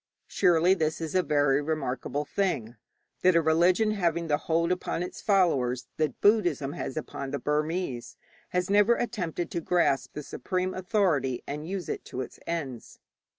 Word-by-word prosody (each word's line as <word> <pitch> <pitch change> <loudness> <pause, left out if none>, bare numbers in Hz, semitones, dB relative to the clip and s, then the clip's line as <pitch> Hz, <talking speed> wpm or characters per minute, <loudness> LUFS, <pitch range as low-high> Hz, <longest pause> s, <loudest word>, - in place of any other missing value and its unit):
Surely 175 -1 +4
this 160 -4 -1
is 160 -2 -4
a 185 - +4
very 145 -4 +2
remarkable 145 -1 -2
thing, 125 - -1 0.5
that 185 -1 +4
a - - +6
religion 175 +7 +3
having 170 -5 0
the 150 -2 +2
hold 170 +2 +2
upon 180 -1 -1
its 180 - -7
followers 135 - +2
that 155 -5 -1
Buddhism 175 -10 +3
has 135 - -5
upon 140 -3 -5
the 140 - -2
Burmese 150 -2 -2 0.3
has 180 0 0
never 205 +4 +4
attempted 175 -9 -3
to 170 - -2
grasp 165 -5 +1
the 150 - -6
supreme 185 +4 -2
authority 175 - 0
and 150 +2 -5
use 190 -2 -4
it - - -4
to 130 - -5
its - - -8
ends. 140 -8 -4
165 Hz, 160 wpm, -28 LUFS, 145-185 Hz, 0.5 s, a